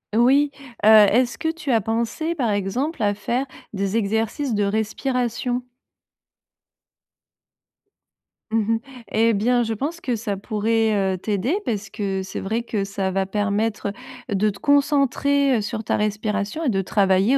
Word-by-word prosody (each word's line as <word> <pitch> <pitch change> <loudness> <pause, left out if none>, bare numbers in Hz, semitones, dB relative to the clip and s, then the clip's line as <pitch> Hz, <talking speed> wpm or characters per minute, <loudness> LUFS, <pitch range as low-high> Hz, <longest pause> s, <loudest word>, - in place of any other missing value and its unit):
Oui, 275 +5 +4 0.3
heu, - - +6
est-ce 220 +3 +6
que 320 0 -1
tu 320 -3 -7
as 225 -3 +3
pensé, 230 - -1
par 250 -9 0
exemple, 215 - -1
à 205 0 +3
faire 235 +6 -2 0.3
des 200 +1 -1
exercices 225 +5 -1
de 205 -1 +1
respiration? 245 +4 -1 2.9
Mmh 225 - +2 0.2
mh. - - -2 0.3
Et 225 +1 +3
bien, 240 +4 +2
je 225 -1 -2
pense 290 +10 -3
que 250 -7 -1
ça 210 -3 -3
pourrait, 220 +1 +1 0.2
heu, - - -6
t'aider 215 - -1
parce 205 -3 -2
que 195 -2 -2
c'est 190 - -6
vrai 225 +4 -2
que 210 -4 -2
ça 195 -1 -2
va 195 0 0
permettre, 205 +2 -1 0.4
heu, - - +1
de 210 +2 +2
te 200 -1 -7
concentrer, 280 -1 +3
heu, - - 0
sur 215 +1 -4
ta - - 0
respiration 210 +5 -2
et 290 - +2
de 195 -4 +1
travailler 195 +5 +3
220 Hz, 155 wpm, -22 LUFS, 205-250 Hz, 2.9 s, heu